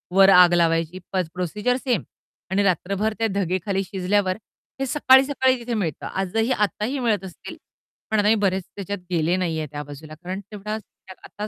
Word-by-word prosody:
वर 195 Hz, 0 st, +7 dB
आग 180 Hz, -2 st, +7 dB
लावायची 165 Hz, +1 st, +1 dB
पेज 185 Hz, -4 st, 0 dB
प्रोसिजर 210 Hz, +7 st, -1 dB
सेम 250 Hz, -5 st, -1 dB, 0.5 s
आणि 195 Hz, +2 st, +2 dB
रात्रभर 200 Hz, +3 st, 0 dB
त्या 225 Hz, -, +2 dB
धगे 185 Hz, -2 st, 0 dB
खाली 195 Hz, -1 st, 0 dB
शिजल्यावर. 190 Hz, 0 st, 0 dB, 0.4 s
हे 270 Hz, -, 0 dB
सकाळी-सकाळी 265 Hz, -1 st, +4 dB
तिथे 240 Hz, 0 st, -4 dB
मिळतं. 175 Hz, -10 st, -2 dB
आजही 220 Hz, +6 st, 0 dB
आत्ताही 215 Hz, +4 st, 0 dB
मिळत 225 Hz, -5 st, +1 dB
असतील. 180 Hz, -, -10 dB, 0.5 s
पण 220 Hz, -, +3 dB
आताही 210 Hz, +2 st, +4 dB
बरेच 190 Hz, -3 st, 0 dB
त्याच्यात 200 Hz, 0 st, -4 dB
गेले 170 Hz, +1 st, +2 dB
नाहीये 165 Hz, -4 st, -1 dB
त्या 145 Hz, 0 st, -5 dB
बाजूला, 145 Hz, +2 st, -10 dB
कारण 180 Hz, +4 st, -6 dB
तेवढा 210 Hz, 0 st, -5 dB, 0.4 s
आता 205 Hz, +2 st, -8 dB
195 Hz, 160 wpm, -23 LUFS, 180-215 Hz, 0.5 s, वर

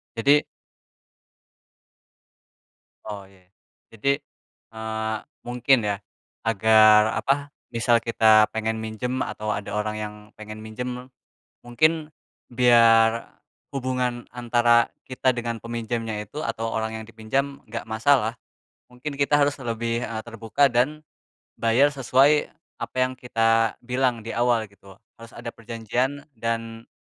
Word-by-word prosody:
Jadi 140 Hz, +6 st, +4 dB, 2.6 s
Oh 105 Hz, -2 st, -6 dB
iya. 95 Hz, -2 st, -23 dB, 0.5 s
Jadi, 140 Hz, +6 st, +1 dB, 0.6 s
eee, 110 Hz, 0 st, -3 dB, 0.3 s
mungkin 125 Hz, +2 st, +3 dB
ya, 100 Hz, -1 st, 0 dB, 0.5 s
agar 110 Hz, 0 st, +6 dB, 0.2 s
apa, 140 Hz, +1 st, 0 dB, 0.2 s
misal 115 Hz, 0 st, +3 dB
kita 110 Hz, -2 st, +5 dB
pengen 110 Hz, 0 st, -2 dB
minjem 110 Hz, +4 st, -3 dB
atau 110 Hz, 0 st, -3 dB
ada 100 Hz, 0 st, -5 dB
orang 105 Hz, 0 st, -2 dB
yang 105 Hz, -1 st, -5 dB, 0.3 s
pengen 110 Hz, 0 st, -8 dB
minjem, 125 Hz, +3 st, -6 dB, 0.5 s
mungkin 155 Hz, +6 st, +1 dB, 0.4 s
biar 115 Hz, -2 st, +4 dB, 0.3 s
hubungan 125 Hz, -2 st, -2 dB
antara 120 Hz, -1 st, +3 dB, 0.2 s
kita 130 Hz, 0 st, +1 dB
dengan 120 Hz, -1 st, -3 dB
peminjamnya 115 Hz, -1 st, -3 dB
itu 150 Hz, +10 st, -6 dB
atau 115 Hz, -2 st, -3 dB
orang 110 Hz, 0 st, -2 dB
yang -, -, -11 dB
dipinjam 135 Hz, +5 st, -2 dB
enggak 115 Hz, +1 st, -6 dB
masalah. 115 Hz, +1 st, +2 dB, 0.6 s
Mungkin 140 Hz, +4 st, -7 dB
kita 140 Hz, +1 st, +2 dB
harus 145 Hz, 0 st, +2 dB
lebih, 115 Hz, -1 st, -2 dB
eee, 110 Hz, -1 st, -5 dB
terbuka 115 Hz, +5 st, +1 dB
dan 130 Hz, +6 st, +1 dB, 0.6 s
bayar 115 Hz, +5 st, +4 dB
sesuai 140 Hz, +2 st, +3 dB, 0.3 s
apa -, -, -6 dB
yang 130 Hz, -, -2 dB
kita 115 Hz, -2 st, +1 dB
bilang 125 Hz, -2 st, 0 dB
di 115 Hz, -, -5 dB
awal 120 Hz, -1 st, +2 dB
gitu. 100 Hz, -1 st, -17 dB, 0.2 s
Harus 115 Hz, 0 st, -12 dB
ada 115 Hz, 0 st, -6 dB
perjanjian 120 Hz, +5 st, -3 dB
dan 115 Hz, -1 st, -4 dB
115 Hz, 120 wpm, -24 LUFS, 110-125 Hz, 2.6 s, agar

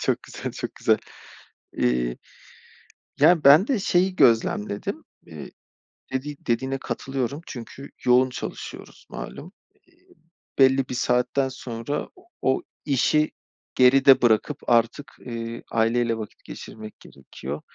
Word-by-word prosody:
Çok -, -, 0 dB
güzel, -, -, -7 dB
çok -, -, -6 dB
güzel. -, -, +2 dB, 0.8 s
Eee. -, -, 0 dB, 1.0 s
Ya 165 Hz, +1 st, +5 dB
ben 150 Hz, +9 st, +8 dB
de 265 Hz, -6 st, +1 dB
şeyi 185 Hz, 0 st, +1 dB
gözlemledim. 105 Hz, -3 st, +1 dB, 0.2 s
Eee, 80 Hz, -4 st, -9 dB, 0.6 s
dedi 140 Hz, +3 st, -3 dB
dediğine 130 Hz, +3 st, 0 dB
katılıyorum 135 Hz, +1 st, -4 dB
çünkü 130 Hz, +3 st, -9 dB
yoğun 125 Hz, +1 st, +4 dB
çalışıyoruz -, -, -8 dB
malum. 175 Hz, +6 st, -8 dB, 1.1 s
Belli 135 Hz, 0 st, +4 dB
bir -, -, -4 dB
saatten 125 Hz, +2 st, +1 dB
sonra 125 Hz, +2 st, -5 dB, 0.3 s
o 130 Hz, -, +1 dB, 0.2 s
işi 150 Hz, +2 st, +2 dB, 0.4 s
geride 135 Hz, +1 st, +6 dB
bırakıp 110 Hz, -3 st, +1 dB
artık, 120 Hz, +4 st, +1 dB
eee, 115 Hz, -1 st, -6 dB
aileyle 115 Hz, +1 st, +1 dB
vakit 110 Hz, -2 st, -9 dB
geçirmek 110 Hz, -1 st, -10 dB
gerekiyor. 70 Hz, -1 st, -9 dB
125 Hz, 110 wpm, -24 LUFS, 115-140 Hz, 1.1 s, ben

